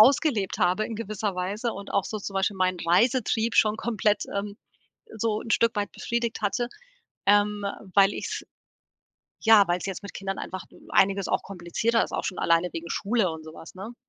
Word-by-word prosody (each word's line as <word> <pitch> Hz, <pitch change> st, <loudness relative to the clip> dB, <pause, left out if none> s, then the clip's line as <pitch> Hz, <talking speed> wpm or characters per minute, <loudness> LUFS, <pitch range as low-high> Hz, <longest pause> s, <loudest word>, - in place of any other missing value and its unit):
ausgelebt 230 Hz, -, +4 dB
habe 185 Hz, +3 st, +2 dB
in 225 Hz, -, -5 dB
gewisser 210 Hz, -2 st, -3 dB
Weise 205 Hz, +6 st, -2 dB
und 200 Hz, +1 st, -8 dB
auch 200 Hz, -, +3 dB
so 215 Hz, -, -4 dB
zum 200 Hz, -1 st, -6 dB
Beispiel 195 Hz, +1 st, 0 dB
meinen 185 Hz, -1 st, +1 dB
Reisetrieb 225 Hz, +5 st, +2 dB
schon 215 Hz, 0 st, +4 dB
komplett, 215 Hz, -3 st, 0 dB
ähm, 200 Hz, 0 st, -3 dB, 0.6 s
so 220 Hz, 0 st, 0 dB
'n 230 Hz, -, -9 dB
Stück 230 Hz, -1 st, +3 dB
weit 205 Hz, 0 st, -1 dB
befriedigt 235 Hz, -2 st, -2 dB
hatte, 235 Hz, +4 st, 0 dB, 0.6 s
ähm, 205 Hz, 0 st, +3 dB, 0.3 s
weil 200 Hz, 0 st, +6 dB
ich's -, -, -4 dB, 1.0 s
ja, 220 Hz, -3 st, +7 dB
weil's 175 Hz, +2 st, 0 dB
jetzt 195 Hz, 0 st, -5 dB
mit 200 Hz, -, -8 dB
Kindern 195 Hz, 0 st, -4 dB
einfach 185 Hz, -1 st, -5 dB, 0.3 s
einiges 195 Hz, 0 st, +3 dB
auch -, -, +1 dB
komplizierter 195 Hz, +5 st, 0 dB
ist, -, -, -10 dB
auch -, -, -2 dB
schon 185 Hz, -, -3 dB
alleine 170 Hz, +1 st, +3 dB
wegen 170 Hz, +1 st, -6 dB
Schule 205 Hz, -3 st, +1 dB
und 160 Hz, 0 st, -7 dB
so 155 Hz, 0 st, -10 dB
was, 165 Hz, -, -11 dB
ne? 200 Hz, +6 st, -8 dB
205 Hz, 185 wpm, -26 LUFS, 185-225 Hz, 1.0 s, ja